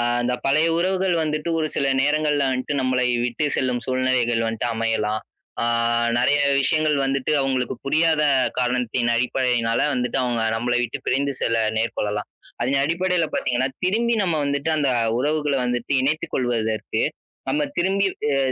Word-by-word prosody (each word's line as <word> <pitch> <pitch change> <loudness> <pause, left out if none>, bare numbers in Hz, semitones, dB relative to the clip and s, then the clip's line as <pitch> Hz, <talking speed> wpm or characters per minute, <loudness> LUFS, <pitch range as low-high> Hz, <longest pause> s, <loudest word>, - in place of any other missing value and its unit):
ஆ - - +1 0.2
அந்த 125 +1 0
பழைய 155 +4 +3
உறவுகள் 185 0 +1
வந்துட்டு 155 +1 -2
ஒரு 155 - 0
சில 140 - +1 0.2
நேரங்கள்ல 150 0 +1
வன்ட்டு 130 +3 -2
நம்மளை 130 -1 +1 0.2
விட்டு 125 +5 -1
செல்லும் 125 -2 0
சூழ்நிலைகள் 130 -3 +1
வந்துட்டு 115 +1 -2
அமையலாம். 110 -1 -1 0.4
ஆ - - +1 0.5
நெறைய 145 +4 +3 0.2
விஷயங்கள் 155 +1 +2
வந்துட்டு 135 +2 -1
அவங்களுக்கு 130 -2 -1
புரியாத 155 +1 +2 0.4
காரணத்தின் 125 -1 0
அடிப்படையினால 120 -2 +1
வந்துட்டு 125 +2 -1
அவங்க 120 -2 -1
நம்பள 120 +2 -1
விட்டு 120 - -3
பிரிந்து 140 +1 +1
செல்ல 115 -1 +1 0.2
நேர்கொள்ளலாம். 105 -2 -2 0.3
அதின் 135 +3 +1
அடிப்படையில 170 +1 +1
பார்த்தீங்கன்னா, 130 +1 0 0.2
திரும்பி 230 +5 +1
நம்ம 170 -4 0
வந்துட்டு 140 +2 -1
அந்த 140 -3 +1 0.3
உறவுகள 150 +1 0
வந்துட்டு 125 +1 -2
இணைத்துக் 150 +4 -1
கொள்வதற்கு, 110 -4 -1 0.5
நம்ம 150 +2 +1 0.2
திரும்பி 195 +3 +2 0.3
அ - - +1
130 Hz, 145 wpm, -22 LUFS, 120-150 Hz, 0.5 s, பழைய